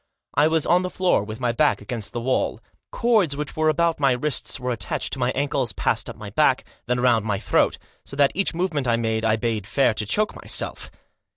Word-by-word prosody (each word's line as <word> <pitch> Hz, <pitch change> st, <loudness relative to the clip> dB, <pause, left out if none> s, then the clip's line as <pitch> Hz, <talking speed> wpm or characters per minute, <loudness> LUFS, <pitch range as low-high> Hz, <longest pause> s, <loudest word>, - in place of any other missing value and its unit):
I 150 Hz, +2 st, +4 dB
was 160 Hz, -1 st, +1 dB
on 180 Hz, +1 st, +4 dB
the 185 Hz, -, -3 dB
floor 180 Hz, -, +1 dB
with 110 Hz, +1 st, -7 dB
my 125 Hz, -2 st, +1 dB
back 150 Hz, +5 st, +2 dB
against 115 Hz, -5 st, -6 dB
the 120 Hz, -, -4 dB
wall. 130 Hz, +2 st, 0 dB, 0.3 s
Cords 215 Hz, -, +2 dB
which 150 Hz, -1 st, -4 dB
were 155 Hz, 0 st, +2 dB
about 165 Hz, +1 st, +1 dB
my 135 Hz, -3 st, +3 dB
wrists 135 Hz, +1 st, -1 dB
were 125 Hz, 0 st, -2 dB
attached 105 Hz, -7 st, -3 dB
to 135 Hz, -, -3 dB
my 125 Hz, 0 st, +1 dB
ankles, 140 Hz, -4 st, -1 dB
passed -, -, -1 dB
up -, -, -7 dB
my -, -, -9 dB
back, -, -, +2 dB, 0.2 s
then 125 Hz, 0 st, 0 dB
round 120 Hz, -3 st, +3 dB
my 105 Hz, -2 st, -1 dB
throat, 105 Hz, -, +1 dB, 0.3 s
so -, -, -8 dB
that 140 Hz, -1 st, +4 dB
each 195 Hz, -2 st, 0 dB
movement 165 Hz, -7 st, -1 dB
I 120 Hz, -, +3 dB
made 110 Hz, -1 st, -1 dB
I 110 Hz, -1 st, +3 dB
bade 110 Hz, -3 st, -2 dB
fair 135 Hz, -5 st, +2 dB
to 110 Hz, 0 st, -2 dB
choke 210 Hz, -, +1 dB
myself. -, -, -2 dB
130 Hz, 220 wpm, -23 LUFS, 115-155 Hz, 0.3 s, I